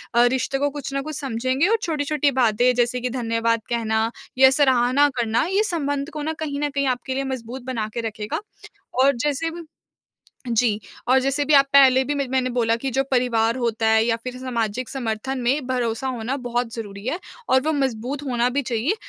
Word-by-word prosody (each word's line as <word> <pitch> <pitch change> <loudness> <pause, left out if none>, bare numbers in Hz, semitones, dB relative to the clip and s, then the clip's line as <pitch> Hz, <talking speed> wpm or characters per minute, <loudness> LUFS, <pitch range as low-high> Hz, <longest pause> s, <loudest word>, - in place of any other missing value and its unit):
अ, 240 - +6
रिश्ते 260 +2 0
को 285 +1 +1
कुछ 280 -1 -6
ना 275 - -1
कुछ 305 +2 -6
समझेंगे 260 +4 0
और 450 +2 +3
छोटी-छोटी 295 -3 0
बातें 245 -1 +3
जैसे 245 +1 +1
कि 250 - -1
धन्यवाद 230 -2 0
कहना 225 -1 0 0.3
या 265 0 +8
सराहना 265 0 +3
करना, 230 -2 +1
ये 390 +3 +2
संबंध 285 -6 -2
को 305 - -4
ना 315 - -2
कहीं 285 -3 -3
न 295 - 0
कहीं 280 0 -1
आपके 255 +1 -2
लिए 275 +1 -1
मजबूत 260 -1 -5
बना 230 -5 -2
के 235 - -2
रखेगा 210 -1 -4 0.6
और 280 0 +4
जैसे 295 +3 0
भी 340 +1 -8 0.9
जी 225 -2 +2 0.3
और 260 +2 +5
जैसे 275 +2 0
भी 305 - +2
आप 275 -1 +7
पहले 265 -2 +7
भी 290 - -1
मैं 280 -1 -1
मैंने 260 -1 0
बोला 230 -2 +1
कि 265 +4 -3
जो 270 +3 +1
परिवार 235 -2 +2
होता 230 -2 0
है 220 0 +4
या 230 -1 +2
फिर 250 0 -6
सामाजिक 245 -2 -3
समर्थन 255 +1 -3
में 255 +2 0
भरोसा 245 -1 -1
होना 250 +1 -2
बहुत 240 -1 -2
ज़रूरी 205 -3 -7
है 315 +8 -2 0.3
और 260 0 +4
वो 315 - +1
मजबूत 265 +1 -2
होना 245 -1 +1
भी 280 +3 0
चाहिए। 245 - -1
255 Hz, 200 wpm, -22 LUFS, 235-280 Hz, 0.9 s, या